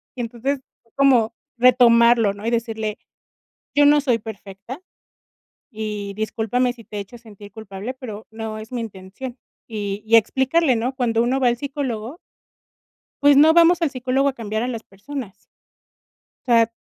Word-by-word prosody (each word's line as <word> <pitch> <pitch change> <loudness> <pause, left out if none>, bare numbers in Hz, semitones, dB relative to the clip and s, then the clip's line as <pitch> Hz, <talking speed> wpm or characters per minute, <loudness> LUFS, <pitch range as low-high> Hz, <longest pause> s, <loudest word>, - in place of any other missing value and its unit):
y 250 - -4
entonces, 245 +4 -3 0.3
como 250 -5 +4 0.2
retomarlo, 235 -3 +5
¿no? 200 +2 -10
Y - - +1
decirle: 220 -2 -2 0.8
"Yo 290 0 +5
no 295 0 +6
soy 250 -5 +2
perfecta, 210 - -9 0.9
y 210 -4 -5
discúlpame 225 +3 0
si 230 -2 -15
te 210 - -8
he - - -2
hecho 220 +5 -11
a - - -20
sentir 205 -3 -14
culpable, 205 +2 -7
pero 220 -5 -9
no 220 -1 -6
es 215 +3 -10
mi 245 -2 -3
intención", 220 +4 -8 0.3
y 205 -2 -4
y 225 +1 +4
explicarle, 265 +6 +3
¿no? 245 +4 -2
Cuando 235 -3 +1
uno 255 +3 +1
va 255 - +3
al 240 - -1
psicólogo 265 -2 -4 1.1
pues 285 0 +6
no 310 +3 +7
vamos 340 +1 +5
al 320 - +2
psicólogo 260 +1 0
a - - 0
cambiar 220 -2 -3
a - - -2
las 230 -3 -4
personas. 210 0 -9 1.0
O 245 - +1
sea, 230 -1 +5
235 Hz, 165 wpm, -21 LUFS, 215-260 Hz, 1.1 s, no